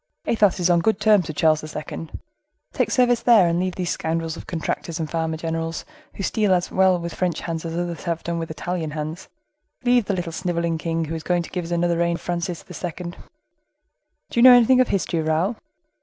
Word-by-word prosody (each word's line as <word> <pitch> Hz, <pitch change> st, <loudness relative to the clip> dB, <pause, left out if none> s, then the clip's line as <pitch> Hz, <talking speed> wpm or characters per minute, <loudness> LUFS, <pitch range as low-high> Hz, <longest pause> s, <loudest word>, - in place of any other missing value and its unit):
Athos 205 Hz, -5 st, +2 dB
is 175 Hz, -, +2 dB
on 170 Hz, -, +4 dB
good 215 Hz, +4 st, +1 dB
terms 210 Hz, -4 st, +4 dB
with 155 Hz, -, -6 dB
Charles 155 Hz, -1 st, +3 dB
II. 155 Hz, +1 st, -6 dB, 0.6 s
Take -, -, 0 dB
service 245 Hz, -2 st, +3 dB
there, 225 Hz, -7 st, +6 dB
and 170 Hz, +1 st, +1 dB
leave 185 Hz, 0 st, -1 dB
these 180 Hz, -2 st, -2 dB
scoundrels 165 Hz, 0 st, -2 dB
of -, -, -10 dB
contractors 165 Hz, 0 st, -3 dB
and 160 Hz, -, -2 dB
farmers 160 Hz, 0 st, -2 dB
general, 165 Hz, 0 st, -2 dB, 0.4 s
who 195 Hz, -, -5 dB
steal 205 Hz, -1 st, +2 dB
as 180 Hz, 0 st, -2 dB
well 190 Hz, -1 st, +4 dB
with 170 Hz, -1 st, -5 dB
French 180 Hz, -2 st, -1 dB
hands 165 Hz, -1 st, -4 dB
as 165 Hz, 0 st, -4 dB
others 175 Hz, -1 st, -4 dB
have 170 Hz, -1 st, -2 dB
done 170 Hz, 0 st, -2 dB
with 165 Hz, -, -4 dB
Italian 160 Hz, +1 st, -3 dB
hands; 155 Hz, +2 st, -6 dB, 0.5 s
leave 245 Hz, -2 st, +3 dB
the 200 Hz, -, -1 dB
little 175 Hz, -2 st, -3 dB
snivelling 170 Hz, -1 st, -2 dB
king, 165 Hz, 0 st, -1 dB
who 160 Hz, -, -5 dB
is 160 Hz, -, -4 dB
going 175 Hz, +1 st, 0 dB
to -, -, -11 dB
give 180 Hz, -2 st, -3 dB
us -, -, -8 dB
another 170 Hz, 0 st, +1 dB
reign 170 Hz, 0 st, +1 dB
of -, -, -8 dB
Francis 175 Hz, -1 st, -3 dB
II. 175 Hz, 0 st, -6 dB
Do -, -, -15 dB, 1.2 s
you 235 Hz, -, +2 dB
know 255 Hz, 0 st, +10 dB
anything 250 Hz, +2 st, +5 dB
of 255 Hz, -, +2 dB
history, 175 Hz, -4 st, -1 dB
Raoul?" 160 Hz, +8 st, 0 dB
170 Hz, 215 wpm, -23 LUFS, 165-185 Hz, 1.2 s, know